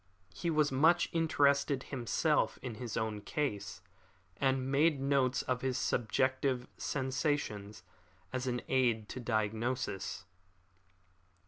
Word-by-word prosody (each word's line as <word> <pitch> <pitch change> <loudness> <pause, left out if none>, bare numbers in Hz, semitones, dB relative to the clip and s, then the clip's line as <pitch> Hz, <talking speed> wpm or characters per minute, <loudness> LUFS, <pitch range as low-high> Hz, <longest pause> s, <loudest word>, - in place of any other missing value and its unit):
He 170 - -2
was 150 -3 +2
much 160 +6 +4
interested 140 -4 +2
himself 120 -4 0
in 125 - -4
his 120 -3 -4
own 110 -2 -2
case, 100 - -3 0.6
and 135 -1 +1
made 150 +1 +3
notes 135 -2 +2
of 125 -1 -1
his 130 -1 0
subjective 130 +2 0
sensations 130 -7 -2 0.5
as 130 0 -2
an 125 -1 -1
aid 120 -5 +2
to - - -5
diagnosis. 110 -4 -2
130 Hz, 110 wpm, -33 LUFS, 115-140 Hz, 0.6 s, much